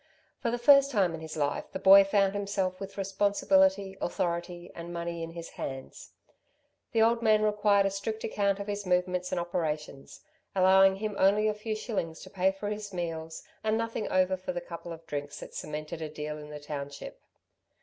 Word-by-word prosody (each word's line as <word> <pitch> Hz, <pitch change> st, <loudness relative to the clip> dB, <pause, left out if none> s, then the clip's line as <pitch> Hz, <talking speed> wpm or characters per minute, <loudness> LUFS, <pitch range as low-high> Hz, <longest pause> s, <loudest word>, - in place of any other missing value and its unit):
For 235 Hz, -, -1 dB
the 240 Hz, -, -1 dB
first 275 Hz, +3 st, +6 dB
time 195 Hz, -9 st, +2 dB
in 160 Hz, -, -6 dB
his 160 Hz, 0 st, -7 dB
life 145 Hz, -1 st, -1 dB
the -, -, -2 dB
boy 195 Hz, +1 st, +8 dB
found 195 Hz, 0 st, +2 dB
himself 200 Hz, -2 st, -2 dB
with 195 Hz, 0 st, -8 dB
responsibility, 195 Hz, 0 st, +2 dB
authority 175 Hz, 0 st, -3 dB
and 170 Hz, +1 st, -8 dB
money 170 Hz, 0 st, -4 dB
in 165 Hz, 0 st, -6 dB
his 170 Hz, -1 st, -7 dB
hands. 135 Hz, -1 st, -7 dB, 0.8 s
The 225 Hz, -2 st, +4 dB
old 230 Hz, +1 st, +3 dB
man 215 Hz, -2 st, +4 dB
required 210 Hz, -1 st, +3 dB
a 195 Hz, -, +1 dB
strict 215 Hz, +3 st, -4 dB
account 200 Hz, -2 st, 0 dB
of 200 Hz, -, -4 dB
his 205 Hz, 0 st, -3 dB
movements 180 Hz, 0 st, 0 dB
and 180 Hz, -, 0 dB
operations, 155 Hz, -5 st, -4 dB, 0.3 s
allowing 190 Hz, +1 st, +6 dB
him 210 Hz, +1 st, -4 dB
only 205 Hz, +3 st, +4 dB
a 215 Hz, -, +2 dB
few 215 Hz, +1 st, -4 dB
shillings 190 Hz, -7 st, -3 dB
to 185 Hz, -, -11 dB
pay 190 Hz, 0 st, +2 dB
for 195 Hz, +2 st, -5 dB
his 210 Hz, -1 st, -5 dB
meals 165 Hz, -3 st, -5 dB, 0.2 s
and 220 Hz, 0 st, +1 dB
nothing 230 Hz, -1 st, -2 dB
over 185 Hz, 0 st, +3 dB
for 185 Hz, 0 st, -5 dB
the 175 Hz, -, -2 dB
couple 170 Hz, 0 st, -8 dB
of 165 Hz, 0 st, -9 dB
drinks 145 Hz, -1 st, -5 dB
that -, -, -10 dB
cemented 155 Hz, +2 st, -5 dB
a 155 Hz, -, -4 dB
deal 150 Hz, 0 st, -5 dB
in 150 Hz, 0 st, -10 dB
the 150 Hz, 0 st, -7 dB
township. 145 Hz, -1 st, -7 dB
190 Hz, 190 wpm, -29 LUFS, 170-205 Hz, 0.8 s, boy